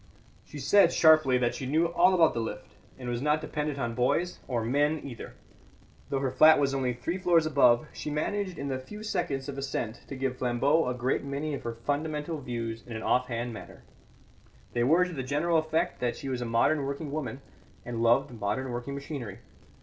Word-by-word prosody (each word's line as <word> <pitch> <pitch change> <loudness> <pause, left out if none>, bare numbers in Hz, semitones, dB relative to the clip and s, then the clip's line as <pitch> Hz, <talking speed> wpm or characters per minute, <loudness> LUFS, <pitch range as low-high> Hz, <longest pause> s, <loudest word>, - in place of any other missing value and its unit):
She 150 - -11
said 170 +6 +5
sharply 155 -5 +5
that 120 -1 +1
she 130 - -5
knew 160 +5 +2
all 175 +2 +4
about 165 -3 +4
the 115 - -2
lift, 115 - -6 0.2
and 125 -2 -8
was 120 0 -2
not 150 +2 +2
dependent 150 -2 -3
on 120 -3 -2
boys 130 +9 0
or 120 -4 -1
men 145 +5 +1
either. 125 -5 -8 0.7
Though 135 -1 -1
her 135 -2 0
flat 155 +5 +7
was 140 -1 +1
only 130 -2 0
three 145 +10 -4
floors 170 -3 +3
above, 140 -4 +4
she - - -5
managed 185 +4 -2
in 140 - -4
the 130 -1 -2
few 210 +12 -9
seconds 135 -10 -2
of 140 -1 -5
ascent 120 -4 -4
to 140 - -6
give 130 -1 -2
Flambeau 130 +5 +2
a 125 - -1
great 125 +2 -1
many 140 +2 -3
of 140 - -4
her 115 -1 -5
fundamental 150 +5 -3
views 115 -3 -4
in 120 - -7
an 110 - -5
off 125 0 +2
hand 120 0 -3
manner; 105 -4 -11 0.9
they 120 - +1
were 165 +8 +4
to 180 - -6
the 135 - -3
general 150 +6 +1
effect 160 0 -1
that 120 -1 -1
she 135 - -6
was 125 -2 -2
a - - -2
modern 140 +6 +2
working 140 +2 -4
woman 135 -5 -4 0.5
and 120 -1 -4
loved 120 +4 +3
modern 110 +6 -2
working 120 +3 -4
machinery. 140 -8 -6
135 Hz, 205 wpm, -28 LUFS, 120-155 Hz, 0.9 s, flat